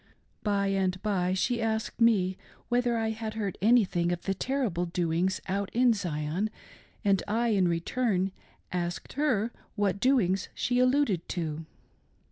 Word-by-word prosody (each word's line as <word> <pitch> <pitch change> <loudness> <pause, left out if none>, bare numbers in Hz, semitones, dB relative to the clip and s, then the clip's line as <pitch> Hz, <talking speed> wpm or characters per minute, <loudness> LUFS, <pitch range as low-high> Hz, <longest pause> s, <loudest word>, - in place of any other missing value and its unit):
By 200 -2 +1
and 190 -1 0
by 185 -3 +1
she 235 +5 0
asked 220 +1 -2
me 195 -5 +4 0.3
whether 240 -1 +2
I 220 0 0
had 220 0 -5
heard 205 -4 -2
anything 195 -6 +3
of 175 -1 -3
the 195 - 0
terrible 200 -6 -1
doings 175 +2 0
out 195 +1 -1
in 245 0 +5
Zion, 175 0 -2 0.6
and 195 -1 +3
I, 230 +3 +1
in 195 -4 +3
return, 190 +3 0 0.4
asked 175 -1 -3
her 240 -6 +1 0.2
whai 205 -2 +2
doings 200 -4 +1
she 245 0 +1
alluded 255 - +2
to. 160 -2 -3
200 Hz, 140 wpm, -29 LUFS, 180-230 Hz, 0.6 s, in